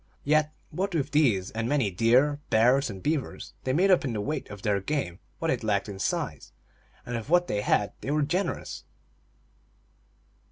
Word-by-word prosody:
Yet, 155 +1 +3 0.2
what 190 +3 -2
with 145 -2 -1
these 115 -11 +2
and 115 +1 -2
many 135 -9 +1
deer, 125 +9 +3
bears, 125 +5 +4
and 95 -3 -8
beavers, 150 -3 -2
they 130 - +1
made 185 +8 +3
up 185 - +5
in 130 -4 -2
the 105 - -2
weight 150 +8 -3
of 100 -1 -9
their 100 -2 +2
game 100 - -2 0.2
what 165 -1 0
it 125 - -1
lacked 105 -2 0
in 100 -2 -7
size, - - -2 0.5
and 120 - -4
of 115 +3 -5
what 175 +1 +4
they 105 -10 -1
had 105 0 +1
they - - -5
were 150 +1 +2
generous. 175 +7 -2
130 Hz, 185 wpm, -27 LUFS, 105-150 Hz, 0.5 s, up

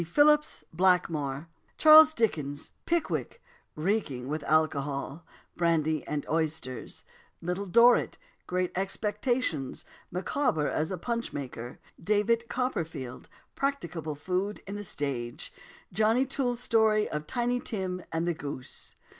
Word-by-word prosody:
Philips 295 - +3
Blackmore 160 -5 +1 0.3
Charles 315 0 +9
Dickens 150 -11 -1 0.2
Pickwick 340 +7 -1 0.4
reeking 155 - -1
with 155 +2 -2
alcohol 150 -1 0 0.3
Brandy 160 -3 +1
and 150 -1 -3
oysters 155 -6 -3 0.4
Little 180 +4 -3
Dorrit 235 +6 +5 0.3
Great 180 0 -1
Expectations 205 - -1 0.2
Micawber 180 - 0
as 155 - -1
a 185 - -3
punch 235 +6 -3
maker 125 -3 -6 0.3
David 215 +4 +1
Copperfield 165 - -3 0.2
"Practicable" 170 - -2
food 185 +7 -2
on 200 - -5
the 205 0 -5
stage 130 -9 -4 0.4
"Johnny" 220 +6 +3
Toole's 250 -3 -1
story 220 -3 +3
of 150 0 -4
Tiny 245 0 0
Tim 185 -6 -3
and 165 +1 -1
the 175 - +2
goose. 140 -4 -7
180 Hz, 115 wpm, -29 LUFS, 150-230 Hz, 0.4 s, Charles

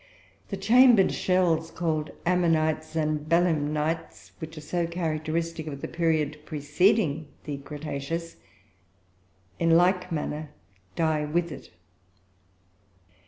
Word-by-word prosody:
The 195 - -3
chambered 230 +1 +6
shells 170 -3 +1
called 160 -3 -2 0.2
ammonites 160 -3 +1
and 155 -1 +1
belemnites, 160 -2 0
which 160 0 -8
are - - -6
so 170 +3 -1
characteristic 165 -1 -2
of 140 -2 -6
the - - -3
period 155 -3 0
preceding 155 +1 +1 0.2
the 145 -2 -4
cretaceous, 150 +3 -5 1.2
in 165 0 +5
like 180 +1 +2
manner 150 -1 -3 0.5
die 155 -2 +1
with 170 +2 -1
it. 135 - -9
160 Hz, 105 wpm, -27 LUFS, 150-175 Hz, 1.2 s, chambered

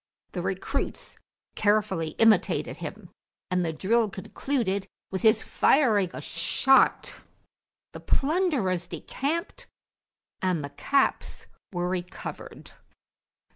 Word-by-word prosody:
The - - -3
recruits - - -4 0.3
carefully 205 -6 +1
imitated 225 -1 +3
him, - - -8 0.4
and 180 0 +2
the 165 - -1
drill 215 +8 +1
concluded 200 -1 -2 0.2
with 190 - -3
his 220 0 +4
firing 220 - +3
a - - -7
shot; 270 0 +2 0.8
the - - -7
plunderers 275 - 0
decamped 315 +5 -4 0.7
and 180 -5 0
the 140 - -6
caps 275 - 0 0.3
were 175 -2 -1
recovered. 180 0 -6
205 Hz, 95 wpm, -27 LUFS, 180-265 Hz, 0.8 s, his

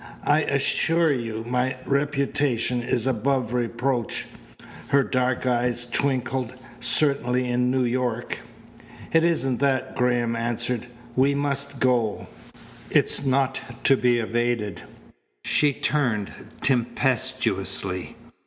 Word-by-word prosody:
I 150 +2 +4
assure 160 +3 +2
you 115 -3 -4
my 125 +2 0
reputation 140 -3 0
is 120 -1 -1
above 130 -1 0
reproach" 120 0 -1 0.6
her 140 0 +4
dark 130 0 0
eyes 120 -1 0
twinkled 130 -1 -1 0.2
"certainly 130 -4 +2
in 125 0 +1
New 130 0 +2
York." 120 -1 -1 0.7
"It 165 0 +5
isn't 135 -7 +1
that," 130 -2 0
Graham 120 -1 +1
answered. 120 +1 -2 0.3
"We 135 +2 +3
must 140 -1 -2
go. 120 -5 +1 0.6
It's - - +2
not 135 0 +1 0.2
to 135 - +5
be 125 -2 +2
evaded." 115 -4 -1 0.6
She 150 -1 +3
turned 125 -8 0 0.3
tempestuously. 125 -4 0
125 Hz, 105 wpm, -24 LUFS, 120-140 Hz, 0.7 s, It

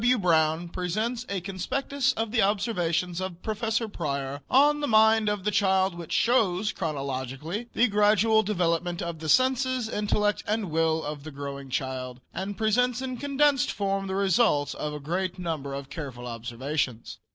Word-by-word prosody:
W. 245 +2 +4
Brown 165 -3 +2
presents 215 +8 -2
a 195 -2 -2
conspectus 255 +9 -1
of 225 -1 -2
the 235 -1 +2
observations 180 -4 0
of 185 -2 -6
Prof. 215 -1 -4 0.3
Preyer 140 -3 -3
on 295 +3 +5
the 290 - -1
mind 220 -1 +5
of 205 -2 -2
the 210 - +1
child 190 -2 +2
which 170 -2 -9
shows 215 -4 +2
chronologically 140 - -4
the 245 - +4
gradual 210 +1 +4
development 175 -3 0
of 170 -2 -5
the 155 0 -5
senses, 255 - +2
intellect 210 -1 0
and 210 -4 -1
will 160 0 +1
of 145 -1 -5
the 155 - -7
growing 140 -1 -7
child 130 -1 -3
and 195 +1 -4
presents 240 +3 +2
in 260 -1 -4
a - - -5
condensed 285 0 +2
form 195 -1 -1
the 190 - -3
result 190 -6 +2
of 150 - -4
a 150 - -5
great 180 +5 -2
number 160 -6 -4
of 140 0 -7
careful 135 -7 -6
observations. 120 +2 -3
185 Hz, 165 wpm, -27 LUFS, 155-220 Hz, 0.3 s, on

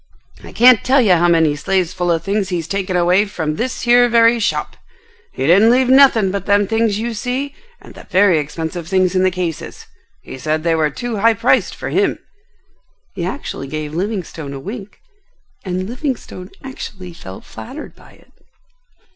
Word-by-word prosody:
I - - -11
can't 245 -1 +5
tell 270 +2 +3
you 215 -7 +4
how 175 0 +3
many 165 -3 +3
sleighs 185 +3 -1
full 175 -1 -2
of 165 -2 0
things 200 0 -1
he's 170 -4 -3
taken 190 0 -2
away 180 +4 +3
from 155 -6 -4
this 255 +2 -3
here 245 0 +5
very 230 0 +4
shop. 220 - -2 0.6
He 135 - -3
didn't 195 +8 +5
leave 250 +1 +3
nothing 260 -7 +5
but 200 -1 -4
them 205 0 +3
things 225 0 0
you 230 +2 -3
see 255 +5 -3 0.3
and - - -15
the - - -14
very 185 -3 +4
expensive 160 +3 -5
things 185 0 +1
in 185 - +2
the 185 - +3
cases. 175 -3 -5 0.4
He 130 - -9
said 155 +2 -2
they 165 -1 +1
were 155 -2 +1
too 235 +9 -5
high 225 +2 +3
priced - - +1
for - - -6
him." - - +1 1.0
He 185 - -5
actually 185 - -5
gave 155 +1 -5
Livingstone 175 -6 -4
a 135 - -6
wink, 205 - -8 0.7
and 185 0 -3
Livingstone 245 -7 -5
actually 195 -9 -8
felt 95 - -11
flattered 270 +6 -10
by - - -18
it. - - -24
190 Hz, 180 wpm, -18 LUFS, 170-230 Hz, 1.0 s, can't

